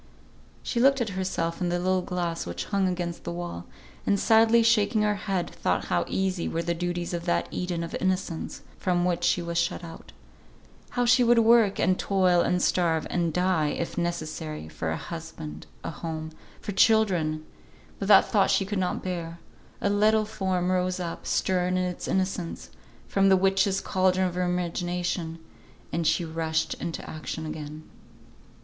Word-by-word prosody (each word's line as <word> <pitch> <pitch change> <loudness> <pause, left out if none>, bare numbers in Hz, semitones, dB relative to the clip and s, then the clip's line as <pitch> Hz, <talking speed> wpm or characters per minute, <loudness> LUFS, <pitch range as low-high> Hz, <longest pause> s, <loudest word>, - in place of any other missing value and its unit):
She 235 - -1
looked 275 +2 +5
at 235 -3 -1
herself 185 -3 -2
in 180 - +1
the 175 - 0
little 185 +1 +1
glass 175 -2 -3
which - - -4
hung 195 -2 +1
against 175 -2 -3
the 170 - -4
wall, 170 - -6 0.4
and 200 - +2
sadly 225 +2 +5
shaking 215 -1 +3
her 210 0 +2
head, 195 -3 -2
thought - - -1
how - - +2
easy 190 -2 -1
were 165 - -2
the 170 - 0
duties 175 +1 -3
of 170 -1 -3
that 85 0 +1
Eden 175 -2 -2
of 165 - -6
innocence 185 -3 -2 0.2
from 175 -1 +1
which 175 -1 0
she 175 - +2
was 170 0 -1
shut 170 - -1
out; 165 -1 -10 0.8
how 245 -3 0
she 250 +1 +5
would 240 0 +5
work, 225 -3 +5
and 185 +1 +2
toil, 185 -3 +3
and 180 +1 +1
starve, 165 -3 +2
and 170 -2 0
die, 180 -2 +1
if 165 +3 -3
necessary, 155 - -3
for 80 +1 -4
a 80 - -1
husband, 160 - -8 0.2
a - - -3
home, 160 -1 -5 0.3
for - - -4
children, 180 -8 +3 0.5
but 195 - -3
that 200 -2 +8
thought 200 -3 +3
she 195 - +2
could 200 0 -2
not 180 -1 -1
bear; 170 -2 -4 0.4
a - - +1
little 215 +1 +3
form 185 -3 -1
rose 185 0 0
up, 170 -2 -5
stern 180 0 +1
in 185 - +1
its 180 -1 -4
innocence, 185 -2 -2 0.4
from 195 0 +3
the 190 - +6
witches' 195 +1 +2
cauldron 185 0 +2
of 180 - -4
her 180 - -2
imagination, 175 -1 -2 0.6
and 165 -1 0
she 160 +2 +2
rushed 160 0 -1
into 170 - -4
action 155 +1 -5
again. 155 0 -7
180 Hz, 175 wpm, -27 LUFS, 170-195 Hz, 0.8 s, that